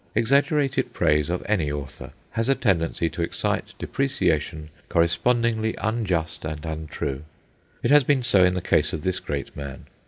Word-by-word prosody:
Exaggerated 140 +3 +2
praise 75 +1 +2
of 90 +1 -2
any 90 -9 +1
author 70 -2 -7 0.2
has 115 +3 -1
a 135 - +4
tendency 85 -7 +1
to 80 +2 -4
excite 85 - -2
depreciation 80 - -1 0.2
correspondingly 110 +6 +2
unjust 95 -7 -1
and 75 0 -5
untrue. 80 -3 -4 0.6
It - - +2
has 145 -1 +7
been 135 -1 +2
so 100 -5 +5
in 90 0 +3
the 90 - -1
case - - +2
of 75 - -4
this 95 0 0
great 70 -1 -5
man. 70 -2 -7
90 Hz, 155 wpm, -24 LUFS, 75-115 Hz, 0.6 s, has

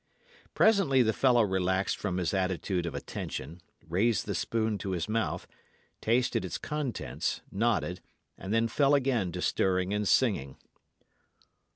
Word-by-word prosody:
Presently 195 - +4
the 110 -1 +1
fellow 125 -2 +4
relaxed 95 -1 0
from 95 -3 -3
his 90 +2 -1
attitude 95 -1 -1
of 75 - -5
attention, 75 +3 -6 0.3
raised 105 +7 +1
the 100 - -2
spoon 110 +4 -1
to 95 0 -3
his 85 0 -2
mouth, 110 0 -1 0.6
tasted 120 -3 +1
its 90 - -4
contents, 150 -6 -3
nodded, 100 -4 0 0.3
and 95 - -7
then 115 +1 +2
fell 140 +4 +3
again 125 -9 +1
to - - -3
stirring 95 0 +1
and 105 0 0
singing. 85 - +2
105 Hz, 140 wpm, -29 LUFS, 90-120 Hz, 0.6 s, Presently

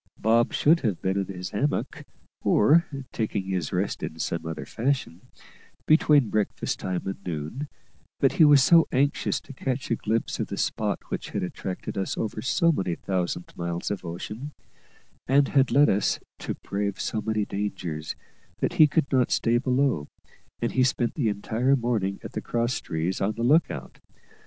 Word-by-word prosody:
Bob 115 +2 +3
should 165 +3 +4
have 110 - -1
been 95 0 -1
in 100 -2 -1
his 90 -2 -6
hammock, 140 +8 -2 0.4
or 155 +10 +4 0.2
taking 110 -3 -2
his 95 -4 -2
rest - - -1
in 80 - -5
some 80 +1 -3
other 80 - -5
fashion, 115 -8 -2 0.6
between 150 -5 +4
breakfast 105 -1 -1
time 90 -1 -3
and 95 0 -5
noon; 85 - -4 0.5
but - - +4
he - - +4
was 145 -3 +7
so 165 +1 +6
anxious 140 +2 +1
to 140 - -12
catch 130 0 -3
a - - +4
glimpse 110 +1 -2
of - - -1
the - - -5
spot - - 0
which - - -4
had - - -2
attracted 90 +1 -5
us 95 - -2
over 110 -1 -3
so 170 - +3
many 95 - -1
thousand 90 -1 -3
miles 85 +1 -3
of 100 - -3
ocean, 105 - -6 0.7
and 140 +1 +4
had 135 -2 +3
led 145 +2 +5
us 100 - +1 0.2
to - - -4
brave 100 0 -3
so 110 - -2
many 110 -1 -1
dangers, 90 -7 -4 0.4
that - - -1
he 160 -4 +7
could 155 0 +1
not 130 -2 +3
stay 120 +1 +2
below, 130 - +1 0.6
and 120 - +1
he 130 - +2
spent 125 -2 +1
the 125 -8 0
entire 115 +6 +1
morning 115 -6 -1
at - - -7
the - - -4
cross 120 +1 -1
trees 85 +3 -2
on 100 +3 +1
the 115 +2 -4
look 150 +7 +4
out. - - -8
110 Hz, 175 wpm, -26 LUFS, 95-135 Hz, 0.7 s, was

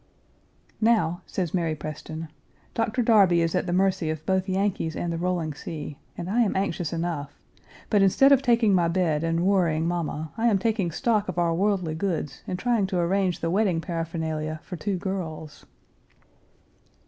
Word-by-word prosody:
"Now," 195 -7 +2
says 180 -5 -3
Mary 165 -4 0
Preston, 155 +1 -7 0.4
"Doctor 230 +2 0
Darby 195 -7 +5
is 165 - 0
at 180 0 0
the - - -1
mercy 185 -2 +1
of 155 0 -4
both 190 +1 0
Yankees 190 -4 0
and 170 -1 -2
the - - -2
rolling 175 -3 -1
sea, 150 0 -7 0.2
and 175 - -5
I 225 +6 +2
am 220 - +1
anxious 190 -4 -1
enough; 165 -4 -3 0.5
but, 205 -2 +3
instead 235 +8 +5
of 275 -1 +6
taking 235 -5 +3
my 175 -2 +3
bed 165 -3 +1
and 165 +1 0
worrying 170 -5 +2
mamma, 160 -3 -3
I 235 - +3
am 215 -4 +4
taking 205 -3 0
stock 210 +3 0
of 180 - -4
our 170 -1 +2
worldly 185 -2 0
goods 160 -4 -3
and 180 - -2
trying 225 -1 +1
to 185 - -2
arrange 180 0 +1
the 165 - 0
wedding 190 -3 +2
paraphernalia 160 -2 -3
for 180 - -7
two 190 +3 -2
girls." 165 -5 -5
175 Hz, 170 wpm, -26 LUFS, 165-195 Hz, 0.5 s, of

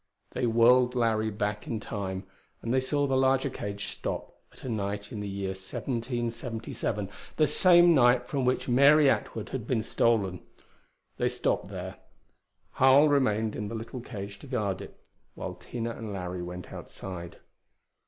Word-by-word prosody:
They 120 - -1
whirled 125 +2 +5
Larry 110 -2 +1
back 105 0 -3
into 110 -3 -4
Time, 95 -2 -3 0.4
and 115 - -1
they 130 - +4
saw 145 +2 0
the 135 -1 +1
larger 130 +1 +2
cage 100 -3 -4
stop - - -5 0.2
at - - -15
a - - -5
night 100 -2 -3
in 110 - -5
the 105 -1 -4
year 100 0 -3
1777 115 +1 -3 0.3
the 155 - +4
same 175 +3 +6
night 125 -3 +5
from 135 +1 -2
which 125 +1 +1
Mary 140 +3 +6
Atwood 110 - -3
had 120 -4 -5
been 115 -4 0
stolen. 100 -8 +1 0.8
They - - +1
stopped - - -1
there. - - -7 0.7
Harl 135 +3 +6
remained 110 -6 +2
in 105 - -3
the 115 - -5
little 115 +3 -6
cage 100 -2 -7
to - - -12
guard 105 -7 -1
it, - - -11 0.4
while - - -5
Tina 115 -1 -5
and 115 -2 -6
Larry 90 -2 -4
went 90 0 -7
outside. 85 -3 -8
115 Hz, 160 wpm, -28 LUFS, 100-130 Hz, 0.8 s, same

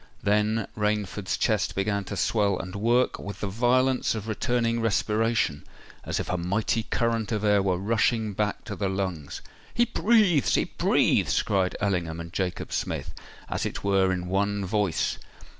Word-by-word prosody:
Then 105 +1 +2
Rainford's 105 -2 -1
chest 110 -5 0
began 100 +1 0
to - - -5
swell 100 -4 +1
and 90 +1 -6
work 120 +5 +1
with 100 - -7
the 105 - -1
violence 125 +5 +2
of 110 -1 -5
returning 115 +1 0
respiration—as 110 -6 -1
if - - -3
a 90 - -1
mighty 100 +6 0
current 115 0 -1
of 105 -2 -1
air 105 -1 +4
were 95 -2 +1
rushing 110 +2 +1
back 105 +1 -2
to - - -6
the 100 -2 -1
lungs. 95 -7 -3 0.3
"He 240 - +4
breathes! 210 - +3
he - - +3
breathes!" - - +2
cried 95 -3 0
Ellingham 90 -5 -1
and 85 0 -8
Jacob 95 -2 -3
Smith, - - -3 0.3
as - - -3
it - - -4
were 95 -1 +3
in 90 -1 -2
one 100 +2 0
voice. 100 -3 0
105 Hz, 160 wpm, -26 LUFS, 95-115 Hz, 0.3 s, air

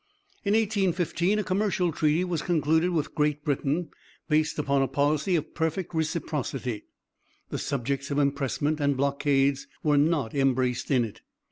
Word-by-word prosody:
In 200 +1 +2
1815 195 -3 +1
a 210 - 0
commercial 185 -2 0
treaty 155 +2 +1
was 175 -4 -2
concluded 160 0 +2
with 160 -4 -1
Great 150 -1 0
Britain 150 +3 -1 0.4
based 155 0 +1
upon 140 -2 +1
a 135 - +2
policy 150 +6 +1
of 155 - -2
perfect 160 +2 -2
reciprocity. 145 -7 -2 0.7
The - - -2
subjects 140 +1 -2
of 140 - -1
impressment 145 +1 0
and 140 -2 +1
blockades 140 0 +1 0.2
were 150 -2 +4
not 145 -6 +1
embraced 130 -3 +1
in 125 -4 +3
it. 110 - -10
150 Hz, 145 wpm, -27 LUFS, 140-170 Hz, 0.7 s, were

